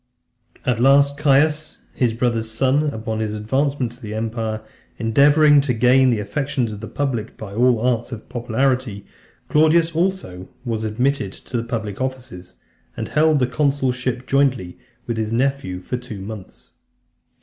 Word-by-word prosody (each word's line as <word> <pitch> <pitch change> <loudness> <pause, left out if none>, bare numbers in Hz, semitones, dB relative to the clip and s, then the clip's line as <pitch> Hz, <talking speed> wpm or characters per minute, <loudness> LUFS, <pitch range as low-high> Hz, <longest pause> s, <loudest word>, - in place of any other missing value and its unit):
VII. - - -26
At 115 - -2
last, 140 +2 +5
Caius, 150 +1 +2 0.2
his 120 -4 0
brother's 115 -2 0
son, 135 +6 +1
upon 110 -3 -4
his 110 -1 -2
advancement 130 +3 -1
to 120 +2 -16
the 105 -2 -6
empire, 110 -1 -3 0.3
endeavouring 145 +5 +5
to 135 -3 -1
gain 130 +3 +4
the 115 -3 +1
affections 125 +3 -2
of 105 - -7
the 110 - -7
public 125 -6 -3
by 100 -3 -8
all 125 +3 +4
the 110 - -5
arts 120 -1 0
of 115 -3 -8
popularity, 125 -3 -1 0.4
Claudius 160 +2 +3
also 160 - -2 0.2
was 115 -2 -2
admitted 120 0 0
to 120 -2 -5
public 115 -2 -4
offices, 130 -9 -6 0.4
and - - -4
held 155 0 +3
the 130 - +2
consulship 130 -3 -1
jointly 130 -11 0 0.3
with 115 - -3
his 110 -1 -2
nephew 130 -6 -1
for 125 +7 -4
two 120 -5 -8
months. 100 0 -10
125 Hz, 155 wpm, -21 LUFS, 110-140 Hz, 0.4 s, last